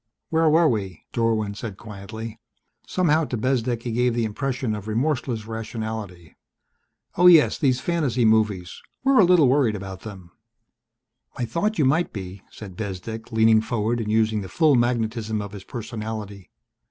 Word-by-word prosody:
"Where 160 Hz, 0 st, +3 dB
were 160 Hz, +2 st, +5 dB
we?" 100 Hz, -, -2 dB
Dorwin 110 Hz, -3 st, 0 dB
said 100 Hz, -1 st, -7 dB
quietly. 110 Hz, +1 st, -8 dB, 0.5 s
Somehow 160 Hz, -3 st, +2 dB
to 125 Hz, -, -4 dB
Bezdek 120 Hz, -1 st, -1 dB
he 120 Hz, -, -3 dB
gave 120 Hz, +1 st, +1 dB
the 120 Hz, -1 st, 0 dB
impression 125 Hz, +1 st, -2 dB
of 105 Hz, -1 st, -6 dB
remorseless 120 Hz, -1 st, -1 dB
rationality. 110 Hz, -6 st, -6 dB, 0.8 s
"Oh, 180 Hz, -, +7 dB
yes, 165 Hz, -4 st, +6 dB
these 130 Hz, -3 st, +2 dB
fantasy 140 Hz, -9 st, 0 dB
movies 105 Hz, -5 st, +1 dB, 0.2 s
we're 270 Hz, -2 st, +4 dB
a -, -, +8 dB
little 175 Hz, -5 st, +5 dB
worried 125 Hz, -4 st, +2 dB
about 95 Hz, -1 st, -7 dB
them." 95 Hz, -5 st, -10 dB, 1.1 s
"I 125 Hz, -, -1 dB
thought 205 Hz, -, -1 dB
you 150 Hz, -, +3 dB
might 155 Hz, +7 st, +2 dB
be," 95 Hz, -1 st, -7 dB
said 100 Hz, -4 st, -10 dB
Bezdek, 110 Hz, +4 st, -6 dB
leaning 110 Hz, 0 st, +4 dB
forward 115 Hz, +1 st, -1 dB
and 105 Hz, -1 st, -3 dB
using 110 Hz, -1 st, +2 dB
the 95 Hz, -, -8 dB
full 155 Hz, -3 st, +3 dB
magnetism 115 Hz, -3 st, 0 dB
of 105 Hz, -1 st, -6 dB
his 100 Hz, -2 st, -10 dB
personality. 110 Hz, -4 st, -6 dB
110 Hz, 155 wpm, -23 LUFS, 105-130 Hz, 1.1 s, a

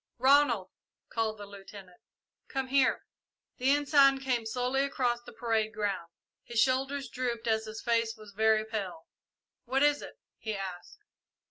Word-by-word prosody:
"Ronald," 255 Hz, -7 st, +4 dB, 0.4 s
called 220 Hz, -1 st, -1 dB
the 205 Hz, -, -8 dB
Lieutenant, 195 Hz, -2 st, -12 dB, 0.5 s
"come 265 Hz, -1 st, -3 dB
here!" 270 Hz, -1 st, +2 dB, 0.5 s
The 255 Hz, +2 st, +1 dB
Ensign 280 Hz, -1 st, +5 dB
came 250 Hz, -4 st, -1 dB
slowly 250 Hz, +4 st, 0 dB
across 250 Hz, -4 st, 0 dB
the -, -, -12 dB
parade 225 Hz, -1 st, -1 dB
ground. 200 Hz, -5 st, -2 dB, 0.3 s
His 235 Hz, -1 st, -2 dB
shoulders 270 Hz, +2 st, +1 dB
drooped 240 Hz, -1 st, -3 dB
and 220 Hz, -1 st, +2 dB
his 220 Hz, 0 st, -8 dB
face 230 Hz, -1 st, +1 dB
was 215 Hz, -1 st, -13 dB
very 220 Hz, +1 st, +3 dB
pale. 195 Hz, -7 st, -5 dB, 0.6 s
"What 265 Hz, +3 st, +1 dB
is 290 Hz, 0 st, +3 dB
it?" -, -, -10 dB, 0.2 s
he 220 Hz, -2 st, -3 dB
asked. 190 Hz, -, -7 dB
235 Hz, 145 wpm, -30 LUFS, 215-265 Hz, 0.6 s, Ensign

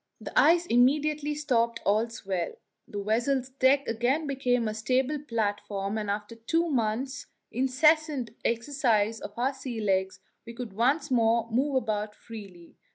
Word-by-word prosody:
The -, -, -8 dB
ice 345 Hz, +1 st, +5 dB
immediately 295 Hz, +4 st, +2 dB
stopped 235 Hz, -5 st, +1 dB
all 215 Hz, +3 st, +2 dB
swell, 190 Hz, -6 st, -3 dB, 0.3 s
the 205 Hz, -1 st, -5 dB
vessel's 245 Hz, +5 st, 0 dB
deck 270 Hz, +1 st, +3 dB
again 245 Hz, +7 st, 0 dB
became 250 Hz, -4 st, 0 dB
a 215 Hz, -, -2 dB
stable 255 Hz, +6 st, 0 dB
platform, 205 Hz, -5 st, -2 dB
and 210 Hz, -1 st, -4 dB
after 210 Hz, +2 st, -3 dB
two 330 Hz, +9 st, 0 dB
months' 260 Hz, +2 st, -1 dB, 0.2 s
incessant 270 Hz, 0 st, +2 dB
exercise 230 Hz, -3 st, +1 dB
of 205 Hz, -, -9 dB
our 260 Hz, +3 st, +1 dB
sea 260 Hz, -3 st, -6 dB
legs 190 Hz, -2 st, 0 dB, 0.2 s
we 235 Hz, 0 st, -10 dB
could 235 Hz, -4 st, -6 dB
once 270 Hz, +7 st, +1 dB
more 230 Hz, -1 st, +3 dB
move 270 Hz, +4 st, +1 dB
about 210 Hz, -4 st, -1 dB
freely. 195 Hz, -7 st, -12 dB
235 Hz, 145 wpm, -28 LUFS, 215-275 Hz, 0.3 s, ice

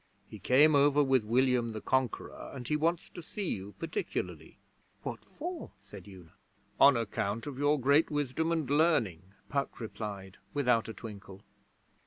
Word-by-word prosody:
He -, -, -10 dB
came 150 Hz, +5 st, +5 dB
over 145 Hz, +1 st, +5 dB
with 130 Hz, -4 st, +3 dB
William 120 Hz, 0 st, +2 dB
the 110 Hz, -, -4 dB
Conqueror, 130 Hz, 0 st, -2 dB
and 125 Hz, -3 st, -7 dB
he 150 Hz, -, +1 dB
wants 165 Hz, +3 st, 0 dB
to 175 Hz, -, -9 dB
see 190 Hz, +4 st, -4 dB
you 100 Hz, +1 st, -5 dB
particularly.' 165 Hz, -1 st, -4 dB, 0.5 s
'What -, -, -5 dB
for?' 345 Hz, +2 st, -7 dB
said 100 Hz, -3 st, -12 dB
Una. 90 Hz, -5 st, -13 dB, 0.5 s
'On 140 Hz, -3 st, +7 dB
account 110 Hz, -1 st, -2 dB
of 140 Hz, -3 st, -6 dB
your 145 Hz, +1 st, +3 dB
great 140 Hz, +5 st, +4 dB
wisdom 145 Hz, +2 st, -1 dB
and 160 Hz, -4 st, 0 dB
learning,' 120 Hz, -, +1 dB
Puck 140 Hz, -1 st, -2 dB
replied, 105 Hz, -4 st, -7 dB, 0.2 s
without 125 Hz, -6 st, +2 dB
a -, -, -5 dB
twinkle. 100 Hz, -3 st, -10 dB
130 Hz, 155 wpm, -31 LUFS, 105-150 Hz, 0.5 s, On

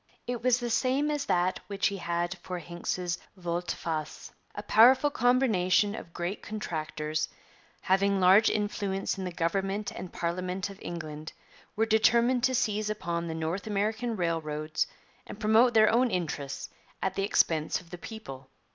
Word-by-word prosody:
It 245 Hz, -1 st, -3 dB
was 250 Hz, 0 st, +3 dB
the 240 Hz, -1 st, -3 dB
same 270 Hz, +5 st, +1 dB
as 295 Hz, -1 st, -2 dB
that 180 Hz, +1 st, +1 dB
which 200 Hz, -1 st, -2 dB
he 200 Hz, -, -5 dB
had 175 Hz, 0 st, -2 dB
for 180 Hz, +1 st, -5 dB
Hincks's 175 Hz, +1 st, -3 dB, 0.2 s
volte 175 Hz, -1 st, -2 dB
face. 155 Hz, -2 st, -5 dB, 0.2 s
'A 205 Hz, -, -5 dB
powerful 255 Hz, +7 st, +6 dB
combination 215 Hz, -7 st, +3 dB
of 170 Hz, -, -8 dB
great 175 Hz, +4 st, -4 dB
contractors, 155 Hz, -6 st, -3 dB, 0.5 s
having 195 Hz, +1 st, +2 dB
large 190 Hz, +4 st, +6 dB
influence 200 Hz, -2 st, -1 dB
in 190 Hz, -, -3 dB
the 180 Hz, -, -3 dB
Government 195 Hz, +5 st, -1 dB
and 180 Hz, -1 st, -7 dB
Parliament 185 Hz, +3 st, -3 dB
of 195 Hz, -, -13 dB
England, 155 Hz, -2 st, -6 dB, 0.4 s
were 220 Hz, -, +2 dB
determined 235 Hz, +3 st, +3 dB
to 260 Hz, 0 st, +1 dB
seize 215 Hz, -2 st, 0 dB
upon 170 Hz, -5 st, -2 dB
the 160 Hz, -, -4 dB
North 160 Hz, +6 st, -3 dB
American 220 Hz, +3 st, -1 dB
railroads 155 Hz, -4 st, -1 dB, 0.4 s
and 205 Hz, -, -9 dB
promote 225 Hz, +3 st, +4 dB
their 215 Hz, -1 st, +6 dB
own 245 Hz, +2 st, +3 dB
interests 155 Hz, -7 st, -3 dB, 0.3 s
at 190 Hz, -, 0 dB
the 195 Hz, -, -2 dB
expense 160 Hz, -6 st, +2 dB
of 175 Hz, -2 st, -17 dB
the 175 Hz, -, -7 dB
people.' 135 Hz, -, -9 dB
190 Hz, 155 wpm, -29 LUFS, 170-220 Hz, 0.5 s, powerful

